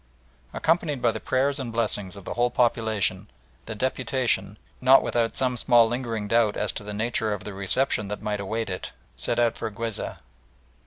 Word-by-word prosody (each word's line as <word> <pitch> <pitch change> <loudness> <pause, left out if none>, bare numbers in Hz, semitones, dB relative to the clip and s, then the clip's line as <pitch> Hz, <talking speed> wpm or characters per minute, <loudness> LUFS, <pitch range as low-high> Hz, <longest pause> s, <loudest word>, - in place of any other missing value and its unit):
Accompanied 160 -4 +1
by 120 -1 +3
the - - -5
prayers 135 +2 0
and 125 -3 -4
blessings 105 -4 -1
of 100 -2 -11
the - - -4
whole 120 +1 +2
population, 110 -5 +1 0.4
the 110 - -5
deputation, 125 -4 0 0.2
not 130 +1 +7
without 115 -1 0
some 125 -1 0
small 120 0 +5
lingering 115 -3 -3
doubt 115 -1 +2
as 105 -2 0
to - - -7
the 105 - -6
nature 110 0 -1
of 105 - -5
the 105 - -6
reception 100 +3 +1
that 105 +1 -4
might 105 -1 -1
await 110 +1 -3
it, 90 - -6 0.2
set - - -2
out 120 -1 +2
for - - -2
Guizeh. 110 +1 -4
115 Hz, 180 wpm, -25 LUFS, 105-125 Hz, 0.4 s, not